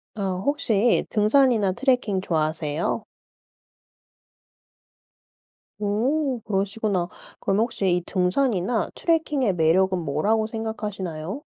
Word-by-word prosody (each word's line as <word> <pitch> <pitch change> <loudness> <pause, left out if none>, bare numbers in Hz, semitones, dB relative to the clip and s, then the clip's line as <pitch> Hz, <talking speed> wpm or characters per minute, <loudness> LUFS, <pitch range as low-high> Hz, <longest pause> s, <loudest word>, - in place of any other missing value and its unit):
어 195 -3 -2
혹시 245 -6 +2
등산이나 215 -2 +3
트래킹 240 -4 +1
좋아하세요? 155 -2 -1 2.8
오 250 +6 0
그러시구나. 200 -2 -1 0.3
그럼 195 +1 0
혹시 225 -4 0
이 180 - 0
등산이나 200 +3 0
트래킹의 300 - +1
매력은 180 +3 +3
뭐라고 175 +9 0
생각하시나요? 210 - -5
205 Hz, 240 characters per minute, -24 LUFS, 185-240 Hz, 2.8 s, 등산이나